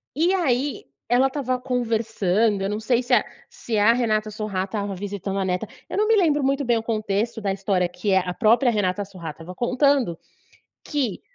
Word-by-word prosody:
e 340 +5 +2
aí 280 -6 0 0.2
ela 250 +3 +4
estava 260 -2 -2
conversando, 225 -5 0
eu 195 - -1
não 210 +1 -2
sei 240 +2 +1
se 250 - -1
a 225 - +5 0.3
se 225 -2 -4
a 210 +3 +5
Renata 215 -3 0
Sorrah 210 -3 -3
estava 200 -1 -4
visitando 195 0 -4
a 190 - 0
neta, 180 -1 -1 0.2
eu - - -4
não 425 +1 +2
me 450 - +5
lembro 305 -7 +3
muito 275 0 +1
bem 235 -1 +3
o 225 - -3
contexto 220 0 -1
da 200 -2 0
história 190 -2 0
que, 200 +3 -4
eh, 190 - +5
a 180 - -3
própria 240 +5 +3
Renata 205 -2 0
Sorrah 175 -5 -8
estava 165 +4 -10
contando, 250 - +2 0.7
que 265 - -2
220 Hz, 195 wpm, -23 LUFS, 195-255 Hz, 0.7 s, a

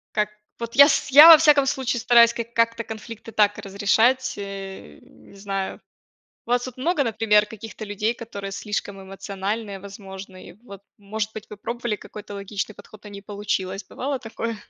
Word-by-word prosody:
Как 210 -1 +1 0.3
вот 235 0 -6
я 280 +1 +9
с - - 0
я, 295 +5 +10
во 325 -2 +11
всяком 295 -3 +5
случае, 260 -3 -1
стараюсь 235 -1 +5
как 235 0 -6
как-то 230 0 +1
конфликты 220 +1 -9
так 205 -1 +2
разрешать, 220 +6 +1
э, 195 - -8
не - - -19
знаю. 195 -1 -4 0.7
У - - -10
вас 245 0 +2
тут 255 -2 -8
много, 295 +2 +1
например, 215 -2 +3
каких-то 220 0 -9
людей, 210 +2 -2
которые 200 -4 -8
слишком 200 -1 -4
эмоциональные, 195 +1 -5
возможно? 195 -1 -10
И - - -12
вот, 200 -5 -12 0.2
может 210 +1 -4
быть, 220 - -7
вы 210 - -8
пробовали 235 0 -3
какой-то 205 0 -10
логичный 200 +1 -5
подход, 215 +1 -16
а 210 - -10
не 200 0 -9
получилось. 200 -1 -4
Бывало 275 +6 -4
такое? 230 -1 -5
215 Hz, 170 wpm, -23 LUFS, 200-235 Hz, 0.7 s, во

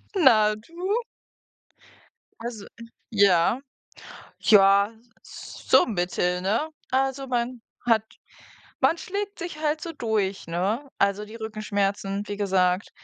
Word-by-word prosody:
Na, 215 - +5
du? 355 - -3 1.4
Also, 230 -4 -6 0.5
ja. 200 +2 +4 0.8
Ja, 200 0 +5 0.3
so - - +1
mittel, 180 -3 -1
ne? 225 +12 0 0.2
Also 270 +1 0
man 245 -1 -2 0.2
hat 225 -2 +3 0.8
man 335 - +4
schlägt 405 +3 -4
sich 345 -3 -6
halt 310 0 0
so 335 - -5
durch, 215 - -1
ne? 200 +11 -1
Also 200 +1 +1
die 215 +2 -11
Rückenschmerzen, 205 -2 -2
wie 205 - -4
gesagt. 190 -1 +1
215 Hz, 105 wpm, -25 LUFS, 200-265 Hz, 1.4 s, Na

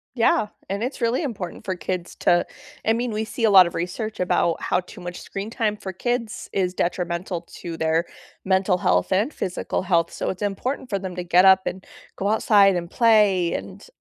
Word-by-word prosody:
Yeah, 225 -3 +3 0.2
and 200 +3 -2
it's 255 +4 -4
really 240 +5 +1
important 200 - -5
for 190 - -2
kids 175 +1 -4
to 175 0 +3 0.4
I 220 - +3
mean, 235 +1 0
we 215 0 -1
see 225 +1 -2
a - - +4
lot 190 -3 +8
of 170 - -5
research 195 +6 -4
about 175 -2 +1
how 180 - +1
too 180 - -13
much 175 0 -7
screen 195 +2 -6
time 220 -3 -1
for 190 -2 -7
kids 240 +2 -3
is 185 -2 0
detrimental 175 0 -2 0.2
to 170 -2 -5
their 160 +1 +1 0.4
mental 190 0 +2
health 90 - +1
and 215 +10 +1
physical 185 0 -3
health, 170 -3 +1
so - - -3
it's 185 - -5
important 245 +6 -3
for 200 - -1
them 185 -2 -6
to 180 - -4
get 180 +2 +4
up 190 0 +7
and 185 +1 -5 0.3
go 195 - -1
outside 205 -2 +4
and 170 -1 -4
play 210 -7 +4
and - - -7
190 Hz, 200 wpm, -23 LUFS, 180-220 Hz, 0.4 s, lot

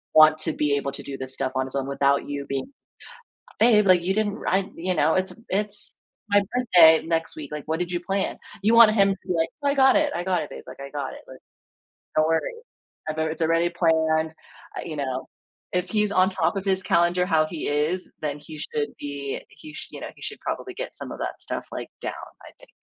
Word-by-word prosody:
want 155 0 +8
to 160 +1 0
be 145 -1 +1
able 140 -1 -2
to - - -7
do 140 -1 -6
this 130 0 -5
stuff 130 -1 -2
on 130 0 +1
his 130 - -5
own 135 0 -1
without 140 0 +1
you 140 -1 -4
being, 135 -1 -2 1.0
"Babe, 215 -3 +6
like, 180 -2 +5
you 190 +2 +1
didn't 210 -1 0
ra 195 -3 +1
you 180 +2 -1
know, 155 +2 +3
it's 185 0 +1
a - - -15
it's 205 +1 -2 0.4
my 205 0 +5
birthday 175 -11 +6
next 165 -1 -1
week, 150 -3 -7
like, 150 -1 -4
what 160 +1 -1
did 180 0 -3
you 175 - -1
plan?" 195 +2 -1 0.3
You 220 +3 +4
want 230 -2 +9
him 200 -2 +4
to - - -4
be 180 - +1
like, 165 0 +1
"Oh, 285 - +2
I 280 - +2
got 265 -1 +6
it, 300 -1 +2
I 175 - -3
got 185 -1 +1
it, - - -8
babe, - - -9
like - - -11
I 140 0 -7
got 140 -3 -4
it. - - -11
Like, 130 - -11 0.8
don't 155 0 +4
worry 165 - 0 0.6
abou 155 0 -2
it's 160 +1 -3
already 165 +1 +3
planned" 160 -2 +2 0.5
uh, - - -2
you 155 - -6
know. 130 -2 -3 0.5
If 180 0 0
he's 210 -1 +1
on 185 -1 +4
top 190 - 0
of 195 - -4
his 190 -1 +1
calendar 175 0 +3
how 160 -3 +3
he 160 -1 -5
is, 150 +5 0
then 150 -1 -3
he 155 +1 -10
should 150 -1 -2
be 140 -1 -4
he 310 -1 -13
sh 305 0 -7
you - - -8
know, - - -5
he - - -19
should - - -5
probably 380 - -4
get - - -6
some - - -6
of - - -7
that - - -4
stuff, - - -5
like, - - -5
down, - - -3 0.3
I - - -12
think. - - -18
165 Hz, 240 wpm, -25 LUFS, 150-195 Hz, 1.0 s, want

